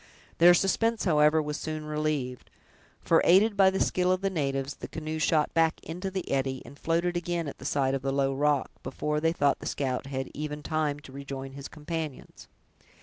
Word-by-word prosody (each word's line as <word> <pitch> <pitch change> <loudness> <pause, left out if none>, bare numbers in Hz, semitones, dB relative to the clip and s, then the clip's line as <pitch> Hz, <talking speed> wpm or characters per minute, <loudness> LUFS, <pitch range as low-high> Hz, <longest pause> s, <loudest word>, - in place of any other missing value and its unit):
Their 175 +1 +8
suspense, 225 +5 +1
however, 155 -2 +4
was 150 0 -3
soon 155 -1 -5
relieved; 150 -4 -2 0.5
for, 165 - +4
aided 200 +5 +5
by 195 -1 +6
the 190 0 -2
skill 180 0 +2
of 185 0 +1
the 195 0 0
natives, 135 -4 -1
the - - -7
canoe 155 0 -5
shot 155 0 +2
back 165 -1 +2
into 180 +4 -5
the 190 -1 -5
eddy, 135 -1 -1
and 140 - -13
floated 170 +2 0
again 175 -1 -2
at 140 - -7
the - - -10
side 135 -2 +1
of 135 - -1
the 135 0 -1
low 135 0 +1
rock, 145 0 +1
before 150 +3 -2
they 165 +1 +2
thought 145 -4 +1
the - - -6
scout 130 -1 -2
had 135 -1 -4
even 150 0 -5
time 150 -2 -1
to 135 - -13
rejoin 135 0 -7
his 140 +1 -8
companions. 155 -2 -6
150 Hz, 200 wpm, -28 LUFS, 140-170 Hz, 0.5 s, Their